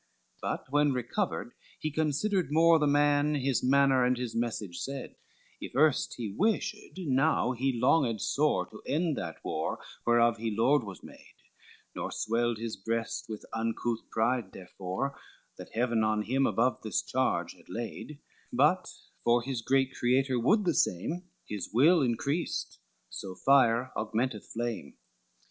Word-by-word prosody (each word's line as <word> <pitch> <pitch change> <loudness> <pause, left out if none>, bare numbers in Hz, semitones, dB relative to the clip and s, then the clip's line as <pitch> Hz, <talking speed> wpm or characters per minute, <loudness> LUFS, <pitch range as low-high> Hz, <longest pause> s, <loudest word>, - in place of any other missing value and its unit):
XVIII - - -42
But 130 - -4
when 145 -1 +3
recovered, 125 - -2 0.2
he 155 - -3
considered 160 +4 0
more, 165 +1 +5
The 150 - +2
man, 145 +1 +3
his 135 -2 0
manner, 135 0 +4
and 125 0 +2
his 125 -2 -4
message 110 -6 -3
said; 135 -1 -5 0.4
If - - -8
erst 150 0 +3
he 115 -4 -4
wished, 215 +2 +1 0.2
now 140 -5 +2
he 130 0 -1
longed 125 -3 +3
sore 135 -7 +1
To 110 - -11
end 160 0 +1
that 80 -2 -5
war, 80 0 -2 0.3
whereof 120 0 +4
he 115 +1 -2
Lord 135 +4 +4
was 100 -4 -9
made; - - -14 0.6
Nor - - -3
swelled 115 +1 0
his 115 0 -4
breast 115 +4 -3
with 110 -1 -6
uncouth 115 +1 -2
pride 115 -2 0
therefore, 95 +8 -5 0.4
That - - -10
Heaven 115 -1 +1
on 110 0 +1
him 135 +4 +1
above 120 -1 +1
this 110 -4 -1
charge - - 0
had - - -22
laid, 120 +5 -6 0.3
But, - - +2 0.3
for 120 0 +3
his 130 -3 -3
great 135 +2 +1
Creator 130 +1 +1
would 205 - +3
the 170 - +2
same, 155 - 0 0.2
His 105 -3 -5
will 155 - +5
increased: 140 +6 -1 0.3
so 95 -1 -6
fire 130 -1 +3
augmenteth 110 0 -2
flame. 120 0 -4
125 Hz, 150 wpm, -30 LUFS, 115-145 Hz, 0.6 s, more